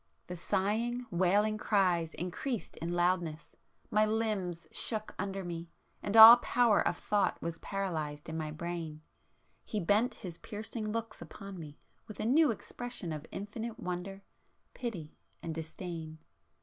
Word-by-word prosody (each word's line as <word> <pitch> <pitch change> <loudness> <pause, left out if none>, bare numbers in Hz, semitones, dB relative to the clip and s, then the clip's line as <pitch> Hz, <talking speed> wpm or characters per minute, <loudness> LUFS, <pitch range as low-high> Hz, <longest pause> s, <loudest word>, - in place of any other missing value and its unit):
The 180 - -6
sighing, 225 +8 0
wailing 200 +4 +2
cries 180 -6 +2
increased 200 +7 -4
in 165 +2 -3
loudness,—my 175 +3 -1
limbs 210 -6 -1
shook 215 -2 -2
under 195 0 -3
me, 170 -1 -5 0.3
and 205 +2 0
all 225 +2 +13
power 240 -3 +3
of - - 0
thought 205 -1 +1
was 165 0 -4
paralysed 160 -7 -3
in 160 - -5
my 155 -1 -2
brain. 160 -1 -5 0.6
He 215 - -3
bent 210 +7 +2
his 175 -3 -8
piercing 215 0 -5
looks 225 -1 -4
upon 195 -2 -9
me 150 -2 -9 0.3
with 215 - -10
a - - -1
new 295 +6 +5
expression 230 -5 -5
of 155 0 -7
infinite 220 +3 -5
wonder, 180 +2 -5 0.5
pity 185 -11 -5 0.3
and 165 - -3
disdain. 160 0 -6
190 Hz, 135 wpm, -32 LUFS, 170-215 Hz, 0.6 s, all